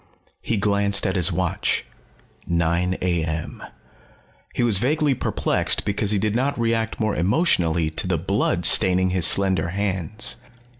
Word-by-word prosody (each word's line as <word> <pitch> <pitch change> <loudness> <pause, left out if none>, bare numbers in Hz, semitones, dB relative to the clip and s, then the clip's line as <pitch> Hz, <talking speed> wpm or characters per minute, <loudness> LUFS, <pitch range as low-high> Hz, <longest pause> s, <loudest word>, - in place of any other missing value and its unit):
He 115 - -2
glanced 100 0 0
at 95 -1 -1
his 90 -4 +2
watch. - - -1 0.6
Nine 85 +2 0
a.m. 80 -3 -3 0.9
He - - 0
was 110 -5 +3
vaguely 145 +4 +1
perplexed - - -1
because 100 0 -1
he 105 - +3
did 105 +2 -1
not 135 +2 -1
react 115 -1 -1
more 110 -2 -1
emotionally 85 - +1
to - - -1
the - - 0
blood - - -1
staining 95 0 +4
his 90 -3 +3
slender 95 -2 +2
hands. 100 +2 -3
100 Hz, 140 wpm, -22 LUFS, 90-110 Hz, 0.9 s, staining